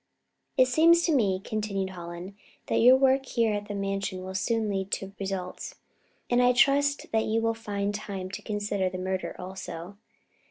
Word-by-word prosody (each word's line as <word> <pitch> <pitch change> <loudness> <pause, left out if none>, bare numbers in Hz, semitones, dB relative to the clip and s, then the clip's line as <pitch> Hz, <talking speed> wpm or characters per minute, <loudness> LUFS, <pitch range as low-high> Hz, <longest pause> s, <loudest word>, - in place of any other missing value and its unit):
"It 255 - +7
seems 335 +6 +5
to 330 - +2
me," 200 -8 +2
continued 200 -3 -2
Hallen, 175 +2 -8 0.3
"that - - +1
your 250 +3 +8
work 265 0 +3
here 230 -3 +1
at 205 0 -3
the 205 - -5
Mansion 195 -1 -3
will 190 0 -6
soon 225 +3 0
lead 195 -1 -2
to 195 0 -3
results, 190 -2 -5 0.5
and 245 0 +3
I 250 0 +5
trust 285 +3 +3
that 220 0 +2
you 220 +1 +1
will 225 0 +1
find 205 -2 -3
time 195 -3 -5
to - - -6
consider 205 -2 -1
the 185 - -6
murder 185 0 -3
also." 185 0 -7
205 Hz, 175 wpm, -27 LUFS, 190-230 Hz, 0.5 s, your